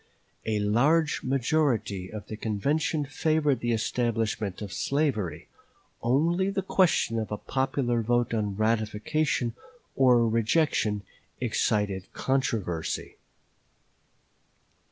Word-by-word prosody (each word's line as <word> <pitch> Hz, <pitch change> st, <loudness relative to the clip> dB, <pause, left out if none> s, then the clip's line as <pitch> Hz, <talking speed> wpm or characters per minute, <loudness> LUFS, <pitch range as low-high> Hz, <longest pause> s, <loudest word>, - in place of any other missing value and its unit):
A 110 Hz, -1 st, +1 dB
large 140 Hz, +10 st, +2 dB
majority 125 Hz, -, 0 dB
of 105 Hz, -1 st, -7 dB
the 110 Hz, -, -6 dB
convention 145 Hz, -, 0 dB
favored 150 Hz, -1 st, +1 dB
the 120 Hz, 0 st, -1 dB
establishment 110 Hz, -3 st, -1 dB
of 100 Hz, -4 st, -6 dB
slavery; 135 Hz, -, -1 dB, 0.5 s
only 165 Hz, +10 st, +2 dB
the 195 Hz, -1 st, -2 dB
question 165 Hz, -11 st, +2 dB
of 110 Hz, -, -4 dB
a 105 Hz, -, -2 dB
popular 130 Hz, -2 st, 0 dB
vote 120 Hz, +1 st, +1 dB
on 105 Hz, -3 st, -1 dB
ratification 115 Hz, +4 st, 0 dB, 0.4 s
or 125 Hz, -3 st, +5 dB
rejection 110 Hz, -2 st, +1 dB, 0.4 s
excited 105 Hz, -5 st, 0 dB
controversy. 110 Hz, -11 st, -2 dB
120 Hz, 95 wpm, -27 LUFS, 105-140 Hz, 0.5 s, or